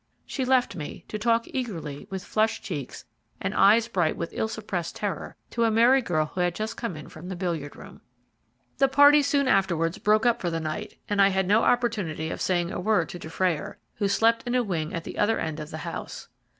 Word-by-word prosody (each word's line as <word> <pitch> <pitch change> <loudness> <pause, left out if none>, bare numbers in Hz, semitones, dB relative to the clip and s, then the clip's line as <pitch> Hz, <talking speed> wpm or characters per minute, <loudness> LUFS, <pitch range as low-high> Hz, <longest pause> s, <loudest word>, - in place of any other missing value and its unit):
She 265 - -3
left 250 -6 +2
me, 150 -4 -7
to 215 - -4
talk 230 +1 +2
eagerly, 165 - -5
with 190 -1 -5
flushed 220 +2 0
cheeks, 140 -4 -6 0.3
and - - -2
eyes 220 +4 +5
bright 175 -8 0
with 170 - -4
ill 220 - -1
suppressed 200 -6 -4
terror, 200 -6 -4 0.2
to 235 - 0
a 225 - +4
merry 235 +4 +5
girl 155 -9 0
who 180 +4 -4
had 175 -1 +1
just 215 +3 -3
come 230 -8 -4
in 150 - -9
from 165 +3 -10
the 185 - -4
billiard 170 -5 -3
room. - - -13 0.8
The 275 - +5
party 285 +2 +7
soon 280 -1 +1
afterwards 185 -4 +1
broke 215 +2 +3
up 240 -1 +2
for 175 - 0
the 165 -1 -2
night, 155 -1 -5
and 205 -1 +2
I 195 - +7
had 190 -1 0
no 210 +3 +4
opportunity 205 -12 0
of - - -5
saying 175 -1 0
a - - -4
word 190 -4 +1
to 175 - -7
Dufrayer, 165 -1 -2 0.2
who 205 - +1
slept 225 +3 +3
in 245 - 0
a 250 - +3
wing 165 -7 -2
at 165 - -4
the - - -7
other 220 +2 +3
end 160 -1 -3
of 155 0 -7
the 155 - -6
house. - - -6
195 Hz, 220 wpm, -26 LUFS, 165-230 Hz, 0.8 s, party